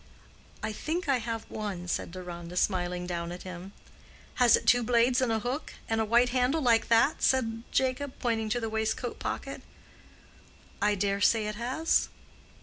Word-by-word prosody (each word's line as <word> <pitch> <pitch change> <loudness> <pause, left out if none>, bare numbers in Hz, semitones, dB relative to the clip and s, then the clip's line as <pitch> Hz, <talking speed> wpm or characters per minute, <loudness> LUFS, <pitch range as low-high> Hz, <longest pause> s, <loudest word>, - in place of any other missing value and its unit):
"I 215 0 -2
think 320 - -3
I 275 -2 +3
have 230 -1 -4
one," 200 -5 -5
said 175 - -2
Deronda, 175 -1 -7
smiling 180 -2 0
down 170 -1 -3
at 180 - -7
him. 185 +1 -8 0.7
"Has 245 -2 +7
it - - -7
two 245 0 +5
blades 240 +2 +3
and 250 -3 +1
a 225 - +2
hook—and 245 -3 -3
a - - +1
white 235 +3 +4
handle 255 +5 +1
like 235 -5 +3
that?" 230 +7 +3
said 230 -4 +2
Jacob, 260 +1 0
pointing 225 -3 -1
to 245 +3 0
the 225 - -3
waistcoat 220 0 -2
pocket. - - -4 1.2
"I 205 0 +3
dare 200 0 0
say 220 +2 +3
it 210 - -2
has." 255 +9 0
225 Hz, 165 wpm, -29 LUFS, 195-250 Hz, 1.2 s, Has